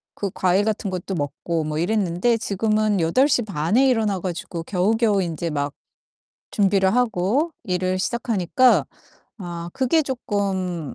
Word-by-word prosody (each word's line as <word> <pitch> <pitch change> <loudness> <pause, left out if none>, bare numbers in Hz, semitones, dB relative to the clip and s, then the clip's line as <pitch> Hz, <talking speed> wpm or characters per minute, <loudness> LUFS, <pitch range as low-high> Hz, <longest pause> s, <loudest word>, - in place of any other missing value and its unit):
그 200 - -3
과일 190 +2 +2
같은 215 -2 -1
것도 185 +1 -4
먹고 160 +2 -2
뭐 150 0 -3
이랬는데 190 +4 +1
지금은 215 -1 0
8:30 200 - +1
에 270 - +5
일어나 220 -6 +1
가지고 170 -2 -5
겨우겨우 205 +3 +1
인제 170 -1 -3
막 145 -2 -2 0.8
준비를 195 -1 +2
하고 245 - +1
일을 185 -2 -1
시작하니까 235 +2 +2 0.5
아 175 -3 -6
그게 270 +5 +2
쪼끔 195 - -3
195 Hz, 265 characters per minute, -22 LUFS, 175-220 Hz, 0.8 s, 에